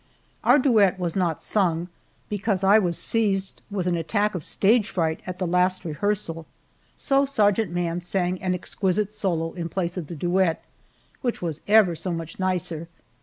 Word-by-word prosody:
Our - - +6
duet 220 -9 +4
was 175 -3 -3
not 175 -5 0
sung, 175 -5 +1 0.4
because 205 -2 -1
I 200 +3 +6
was 175 -5 0
seized 195 -4 0
with 195 -3 -2
an 180 -1 +1
attack 170 +6 0
of 180 -5 -4
stage 215 +6 +2
fright 160 -2 -1
at 180 -1 -5
the 185 - -2
last 180 +1 +1
rehearsal, 165 0 -2 0.5
so 275 -1 +2
Sergeant 210 -6 +2
Mann 175 0 -1
sang 180 0 -1
an 185 -1 0
exquisite 195 +3 -1
solo 170 -6 -1
in 170 -2 -4
place 175 +1 -2
of 170 -5 -4
the 170 - -7
duet, 175 +1 +1 0.6
which 240 -7 -2
was 160 -3 -3
ever 210 -4 +5
so 165 +3 -4
much 165 0 -5
nicer. 175 -3 -2
185 Hz, 170 wpm, -24 LUFS, 170-205 Hz, 0.6 s, Our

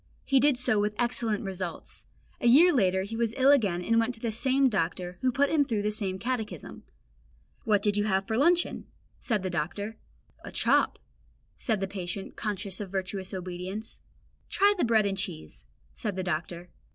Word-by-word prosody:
He 270 -1 +4
did 285 -1 +3
so 245 -4 +3
with 210 +1 0
excellent 235 -3 -1
results. 185 -3 -6 0.3
A - - +1
year 320 +9 +7
later 190 -6 +2
he 210 +3 -6
was 230 -1 -1
ill 270 +1 +6
again 200 -11 +2
and 230 +4 +3
went 230 +2 0
to - - -16
the 230 -1 -2
same 265 +4 +2
doctor, 180 -4 -2
who 255 - +2
put 280 +3 +2
him 310 -2 +4
through 225 -7 -2
the 210 - 0
same 195 -3 -2
catechism. 230 +1 -4 0.8
"What 210 -3 +2
do 210 - +3
you 205 0 0
have 195 -2 +1
for 220 - -2
luncheon?" 340 +7 +2 0.3
said 215 -6 -1
the 185 - -2
doctor. 200 +7 -3 0.5
"A - - -8
chop," - - +2 0.6
said 220 -6 -1
the 195 - 0
patient, 190 0 -6
conscious 200 -2 -4
of 200 - -5
virtuous 190 0 -4
obedience. 185 +3 -6 0.5
"Try 405 +1 +4
bread 225 -3 +3
and 195 -1 -1
cheese," 170 -5 -5 0.3
said 210 -5 -4
the 190 - -2
doctor. 175 0 -4
210 Hz, 180 wpm, -28 LUFS, 190-235 Hz, 0.8 s, year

